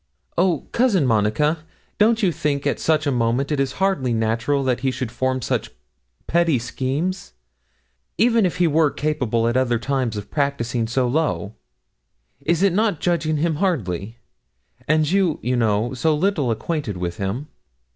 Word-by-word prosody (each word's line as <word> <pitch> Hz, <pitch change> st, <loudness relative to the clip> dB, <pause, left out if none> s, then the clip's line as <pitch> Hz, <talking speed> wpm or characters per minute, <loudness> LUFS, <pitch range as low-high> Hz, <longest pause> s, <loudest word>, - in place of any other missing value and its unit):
'Oh, 175 Hz, -3 st, +2 dB
Cousin 225 Hz, -, +2 dB
Monica, 120 Hz, +8 st, +1 dB, 0.4 s
don't 225 Hz, +2 st, +3 dB
you 185 Hz, -, +4 dB
think 145 Hz, -2 st, -2 dB
at -, -, 0 dB
such 155 Hz, -1 st, +1 dB
a 140 Hz, -, +1 dB
moment 120 Hz, +3 st, 0 dB
it 150 Hz, -, 0 dB
is 135 Hz, -1 st, 0 dB
hardly 190 Hz, -11 st, 0 dB
natural 115 Hz, +5 st, 0 dB
that 130 Hz, -2 st, 0 dB
he 135 Hz, -, 0 dB
should 125 Hz, -2 st, -4 dB
form 130 Hz, +1 st, -1 dB
such -, -, -1 dB, 0.6 s
petty 170 Hz, -4 st, +2 dB
schemes, 135 Hz, -, -3 dB, 0.8 s
even 225 Hz, -3 st, +3 dB, 0.2 s
were 160 Hz, -1 st, +4 dB
he -, -, -14 dB
capable 125 Hz, -7 st, 0 dB
at 120 Hz, -, 0 dB
other 125 Hz, -2 st, +2 dB
times 125 Hz, -2 st, -1 dB
of 100 Hz, -, -7 dB
practising 125 Hz, -5 st, -1 dB
so 125 Hz, +2 st, +1 dB
low? 130 Hz, -6 st, -1 dB, 0.9 s
Is 170 Hz, +2 st, +1 dB
it 195 Hz, -3 st, +4 dB
not 210 Hz, -4 st, +1 dB
judging 160 Hz, -3 st, 0 dB
him 160 Hz, 0 st, 0 dB
hardly? 115 Hz, -, -2 dB, 0.7 s
and 155 Hz, 0 st, +3 dB
you, 190 Hz, -5 st, +2 dB
you 125 Hz, +1 st, 0 dB
know, 115 Hz, 0 st, +1 dB
so 155 Hz, +5 st, +1 dB
little 160 Hz, -5 st, +1 dB
acquainted 115 Hz, -, -2 dB
with 85 Hz, -1 st, -4 dB
him.' 100 Hz, +9 st, -3 dB
140 Hz, 155 wpm, -22 LUFS, 120-165 Hz, 0.9 s, you